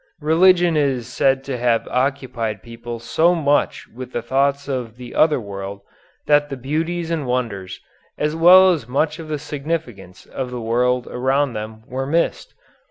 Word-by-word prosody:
Religion 175 +2 +4
is 135 -5 +1
said 135 +2 +1
to 135 -3 -4
have 120 -1 +1
occupied 125 -6 -2
people 115 0 -7
so 165 +9 +2
much 145 -3 0
with 125 +2 -10
thoughts 140 +4 0
of 125 -4 -4
the 125 -1 -10
other 155 -3 +3
world 100 -2 -7 0.4
that 145 0 +3
the 135 - -5
beauties 165 +6 -2
and 155 -5 -2
wonders, 115 -7 -3 0.4
as 150 +1 -1
well 185 +3 +7
as 150 -10 -2
much 150 +5 0
of 160 - -8
the 155 -1 -2
significance, 145 - -5
of 130 -2 -5
the 125 -1 -5
world 125 +2 +1
around 135 +1 0
them 110 0 -7
were 135 0 -4
missed. 165 +4 -1
135 Hz, 160 wpm, -20 LUFS, 120-150 Hz, 0.4 s, well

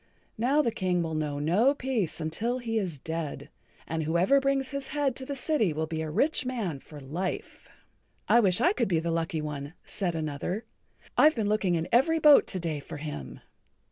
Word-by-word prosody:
Now 275 +6 +3
the 235 - +1
King 180 -4 0
will 160 -1 -3
know 150 -2 -2
no 195 - +3
peace 250 - -2
until 205 +11 -2
he[Pg 250 - -9 0.2
66] - - -1
is - - -7
dead. 160 +1 -5 0.4
And 165 0 -2
whoever 170 - +3
brings 275 0 0
his 280 -1 -4
head 280 -3 0
to 260 - -7
the 280 - -3
city 255 - +1
will 160 +1 -1
be 160 0 -4
a 160 - -3
rich 255 - +1
man 225 - -3
for 150 +2 -12
life." 160 +8 -5 0.6
"I 235 - +6
wish 190 -5 +3
I 355 +5 +4
could 235 - 0
be 175 - +1
the 165 +1 -2
lucky 165 -1 -1
one," 145 +1 -5
said 180 -5 -2
another. 160 +7 -3 0.5
"I've 305 +1 +7
been 220 -3 0
looking 205 -4 +2
in 165 +1 -1
every 280 +8 +4
boat 300 -2 +7
to 185 - -2
day 165 -3 -2
for 140 - -8
him." 145 - -7
180 Hz, 205 wpm, -28 LUFS, 160-255 Hz, 0.6 s, I've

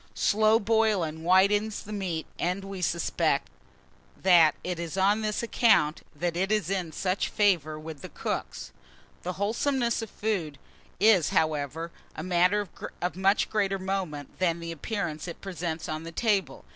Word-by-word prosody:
Slow 215 +1 +4
boiling 210 -7 +1
whitens 200 +5 +3
the 210 - -8
meat; 180 -6 -3
and, 180 +3 -1
we 195 -1 -6
suspect, 170 -1 0 0.7
that 170 -5 +5
it 180 -1 -3
is 170 +1 -5
on 200 +3 +3
this 215 +1 -1
account 175 -10 +3
that 170 +2 -2
it 190 +3 0
is 210 -4 +1
in 180 -4 -1
such 185 +4 -1
favour 170 -8 +2
with 155 -2 -8
the - - -8
cooks. - - -4 0.5
The 180 - -3
wholesomeness 235 +5 0
of 225 - -6
food 185 -11 -2 0.4
is, 200 -5 +5
however, 155 +1 0 0.2
a 155 - -5
matter 185 +3 +2 0.3
of 180 0 -2
much 195 +2 +2
greater 195 -2 0
moment 185 -6 -4
than 170 -2 +1
the 170 0 -5
appearance 165 -1 -4
it 170 - -7
presents 170 -4 -4
on 155 0 -3
the 165 +1 -8
table. 205 0 0
185 Hz, 155 wpm, -28 LUFS, 165-205 Hz, 0.7 s, that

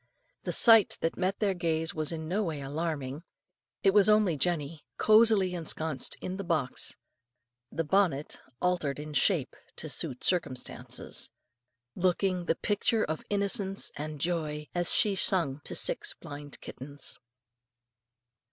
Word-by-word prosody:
The - - -1
sight 225 -4 +6
that 165 - -1
met 190 +1 -1
their 205 -3 +1
gaze 165 -2 -1
was 155 0 -2
in 160 -1 -5
no 190 +6 0
way 160 -6 -3
alarming: 145 -1 -4 0.6
it 195 - +4
was 205 0 +5
only 210 -5 +4
Jenny 155 -1 -2
cosily 215 -4 +4
ensconced 160 -4 0
in 185 +1 -5
the 195 - -4
box 155 -7 0 0.8
the 165 - -2
bonnet 160 -3 0 0.2
altered 175 -6 0
in 150 +1 -7
shape 140 - +1 0.2
to - - -5
suit 125 - +1
circumstances 150 -8 -2 0.6
looking 180 +1 0
the 165 - +1
picture 215 +3 0
of 155 +1 -3
innocence 200 -1 +1
and 150 0 -6
joy 150 -2 -3
as 175 -1 +3
she 205 -2 +4
sung 160 -8 +1
to - - -3
six - - 0
blind 145 0 -9
kittens. 140 +1 -7
165 Hz, 135 wpm, -29 LUFS, 150-195 Hz, 0.8 s, sight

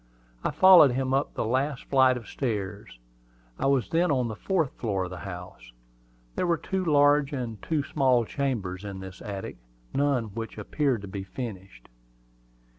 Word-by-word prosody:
I - - +1
followed 185 -8 +7
him 130 +1 -1
up 140 +2 0
the - - -1
last 130 +4 -1
flight 130 -2 +4
of 115 -4 -10
stairs. 105 - -4 0.6
I - - +1
was 135 -3 +2
then 170 +2 +2
on 125 -4 +1
the 110 - -5
fourth 165 - 0
floor 100 -5 -2
of 90 - -6
the 90 - -7
house. 90 -10 -10 0.6
There 180 - 0
were 170 -1 +2
two 190 +2 -2
large 145 -2 +4
and 120 -5 -4
two 155 -3 -1
small 130 -5 +2
chambers 105 -9 -3
in 100 -2 -6
this 95 -1 -10
attic, 100 -9 -6 0.4
none 140 -3 +2
of 105 -3 -11
which 115 -1 -5
appeared 125 +1 -1
to - - -6
be 95 0 -5
furnished. 95 - -8
125 Hz, 175 wpm, -27 LUFS, 100-140 Hz, 0.6 s, followed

